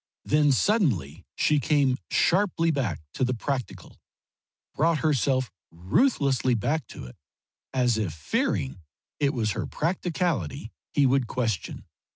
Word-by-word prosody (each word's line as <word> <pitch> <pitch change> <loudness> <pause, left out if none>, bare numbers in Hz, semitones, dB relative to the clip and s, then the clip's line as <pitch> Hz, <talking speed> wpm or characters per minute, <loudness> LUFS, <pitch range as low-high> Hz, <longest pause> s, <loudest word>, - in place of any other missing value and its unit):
Then 150 -1 +3
suddenly 115 - +1
she 150 -1 +2
came 140 -3 +2
sharply 175 -3 +2
back 115 - -2
to - - -2
the 125 0 +1
practical, 130 +1 -5 0.7
brought 160 +2 +2
herself 135 -3 +1 0.2
ruthlessly 130 - +1
back 145 +6 -1
to - - -9
it, 60 - -12 0.6
as 125 -4 +1
if 100 -6 -1
fearing 75 -1 -2 0.4
it 140 -2 +2
was 110 -5 -1
her - - -3
practicality 165 - -2 0.2
he 145 - +3
would 130 -2 +2
question. 110 -8 -3
130 Hz, 125 wpm, -26 LUFS, 110-150 Hz, 0.7 s, Then